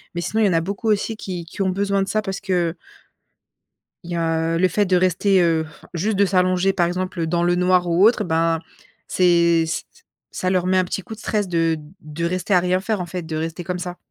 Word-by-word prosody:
Mais 175 - -2
sinon 220 +5 -1
il - - +5
y - - +2
en - - +1
a 165 - +2
beaucoup 200 +5 -3
aussi 215 +1 0
qui 180 -5 -6
qui 170 +4 -7
ont 190 - +2
besoin 200 +1 0
de - - -6
ça, 215 +1 +1
parce 195 -2 -5
que 180 -4 0 1.3
il 175 - -9
y - - -2
a 165 0 0
le 185 +2 +3
fait 205 +4 +1
de 185 -1 +2
rester, 185 +2 +3
heu, 165 -2 +2 0.3
juste 195 +4 -1
de 200 - +4
s'allonger 185 0 +2
par 175 - +2
exemple, 180 0 -3
heu, 165 - -1
dans 170 +1 0
le 175 0 +2
noir 180 0 +2
ou 175 +4 +4
autre 235 - +4
et - - +1
ben, 165 0 +1 0.5
c'est 170 -2 +3
ç 160 0 -2
ç - - -25 0.3
ça 185 - -2
leur 185 -1 +1
met 185 - +3
un 185 - +4
petit 180 +2 -4
coup 220 - -9
de - - -16
stress 210 -3 -1
de 165 -2 +1 0.2
de 155 +2 -5
rester 185 +3 -1
à 180 - +6
rien 180 +1 +1
faire 210 0 -2
en 180 - -3
fait, 180 0 -5
de 160 -1 -5
rester 165 +2 -4
comme 180 0 -4
ça. 180 0 -6
180 Hz, 255 wpm, -21 LUFS, 170-190 Hz, 1.3 s, à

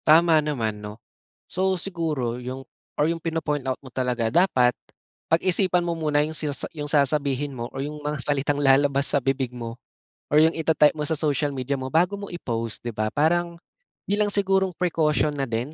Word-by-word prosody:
Tama 160 0 +6
naman 115 -8 -2
'no. 105 +1 -8 0.5
So, 190 +1 0
siguro 155 -11 -2
yung, 130 +2 -6 0.4
or 150 - +3
yung 165 - -5
pino-point 155 -4 -2
out 130 - 0
mo 135 - -12
talaga 125 -3 -1
dapat 130 -9 +4 0.6
pag-isipan 180 +1 +3
mo 170 -1 -2
muna 150 -2 +1
yung 155 +1 -1
sina 150 -2 -1 0.2
yung 150 - -4
sasabihin 140 -1 +1
mo 120 0 -4
o 135 - -5
yung 150 +2 -4
mga 150 -1 -2
salitang 145 +1 0
lalabas 140 0 +3
sa - - +2
bibig 135 0 0
mo 115 0 -7 0.5
or 150 - +7
yung 160 +1 +4
ita-type 160 -1 +3
mo 150 - -2
sa 160 - 0
social 145 -2 0
media 135 +1 -2
mo 130 +1 -6
bago 180 +5 +2
mo 200 - -6
i-post, 115 -9 -4
'di 120 - -4
ba? 110 -1 -3
Parang, 170 +3 +1 0.5
bilang 205 +1 +2
sigurong 195 -1 +2
pre-caution 155 -3 +1
na 140 -2 -2
din 120 +6 -3
150 Hz, 185 wpm, -24 LUFS, 130-165 Hz, 0.6 s, or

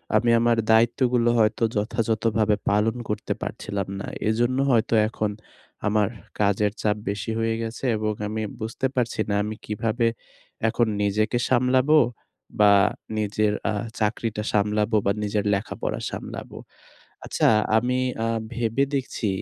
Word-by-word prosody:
আমি 120 - +3
আমার 120 0 +3
দায়িত্বগুলো 120 +1 +3
হয়তো 110 +1 +2
যথাযথভাবে 110 0 +1
পালন 105 +3 +2
করতে 105 - -2
পারছিলাম 100 -2 -4
না। - - -6 0.2
এজন্য 120 +3 +1
হয়তো 115 -1 +2
এখন 110 -1 -2 0.6
আমার 105 -1 +2 0.3
কাজের 105 0 +2
চাপ 105 -1 +2
বেশি 100 +2 -3
হয়ে 115 0 0
গেছে 115 +2 -6
এবং 110 0 -1
আমি 110 +1 -3 0.2
বুঝতে 110 +4 -1
পারছি 120 -3 -1
না - - +1
আমি 105 +1 -4
কিভাবে 110 +2 -1 0.6
এখন 115 +1 +2
নিজেকে 105 +4 +1
সামলাবো? 130 +4 +4 0.6
বা 105 -1 +7 0.5
নিজের 105 0 +1 0.2
আ - - +1 0.3
চাকরিটা 110 0 -1
সামলাবো 105 +2 +1
বা 100 - +3
নিজের 105 0 -1
লেখাপড়া 100 +2 -3
সামলাবো। - - -7 0.7
আচ্ছা - - +1 0.3
আমি 125 +2 +1 0.3
আ - - +1 0.3
ভেবে 120 +3 0
দেখছি। 130 -4 -2
110 Hz, 130 wpm, -24 LUFS, 105-120 Hz, 0.7 s, বা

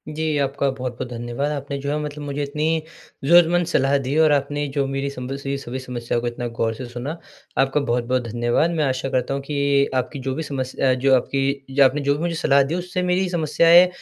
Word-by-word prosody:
जी, 155 -1 0
आपका 140 0 0
बहुत-बहुत 125 -2 -5
धन्यवाद। 120 +4 -3
आपने 140 -1 -4
जो 140 +1 -4
है, 150 - 0
मतलब 150 0 -6
मुझे 145 0 -3
इतनी 150 +2 -2 0.6
ज़रूरतमंद 175 +2 +5
सलाह 135 +1 +3
दी 140 +4 -1
और 155 - +4
आपने 145 +1 0
जो 140 - +2
मेरी 135 +1 -1
सिम्पल 125 +2 -5
सी 140 0 -3
सभी 130 -1 -6
समस्याओं 120 -1 -2
को 120 - -2
इतना 120 0 -4
गौर 115 0 +1
से 125 +3 -7
सुना, 125 +7 -5 0.4
आपका 135 +2 +2
बहुत-बहुत 125 +1 0
धन्यवाद। 120 +7 +1
मैं 150 - +3
आशा 130 0 -1
करता 130 +1 0
हूँ 140 - -2
कि 145 -1 -2 0.4
आपकी 135 +3 -9
जो 130 - -2
भी 160 - -3
समस 130 -3 -4
अ, 130 -1 +3
जो 130 +1 +3
आपकी 135 +2 0 0.3
जो 140 +1 +4
आपने 145 +3 +2
जो 140 0 +1
भी 150 - -5
मुझे 170 -1 -1
सलाह 140 -3 +4
दी, 145 +5 -2
उससे 180 0 -3
मेरी 185 +1 +1
समस्याएँ 170 +1 +5
140 Hz, 220 wpm, -22 LUFS, 130-150 Hz, 0.6 s, ज़रूरतमंद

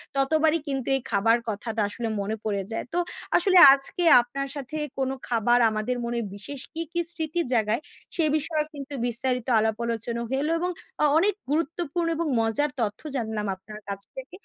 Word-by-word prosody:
ততবারই 310 +4 +3
কিন্তু 270 -3 -3
এই 270 - -1
খাবার 225 +4 +3
কথাটা 220 +1 -3
আসলে 230 +2 -4
মনে 215 +2 -2
পড়ে 200 -3 -1
যায়। 225 - -3
তো 350 - 0 0.4
আসলে 370 +1 +3 0.2
আজকে 280 +6 +1 0.2
আপনার 275 +3 -5
সাথে 280 +1 -6 0.2
কোনো 265 0 -1
খাবার 240 +1 +3
আমাদের 215 +3 -2
মনে 235 0 -2 0.2
বিশেষ 255 +7 -8
কি, 330 - -4
কি 345 - -2
স্মৃতির 325 -1 -2
জায়গায়, 225 +2 +1 0.3
সে 330 - +1
বিষয়ে 305 +1 -1
কিন্তু 285 0 -8
বিস্তারিত 250 +1 -1
আলাপ 220 0 0
আলোচনা 235 0 -2
হলো 280 +4 0
এবং 360 +1 -1 0.3
অ - - +6
অনেক 395 +5 +3 0.2
গুরুত্বপূর্ণ 335 +1 -1
এবং 335 0 -1
মজার 225 +7 +2
তথ্য 210 -2 -2
জানলাম 220 -4 -2
আপনার 210 +3 -11
কাছ 200 0 -5
থেকে। 265 +4 -8
255 Hz, 170 wpm, -25 LUFS, 225-310 Hz, 0.4 s, অ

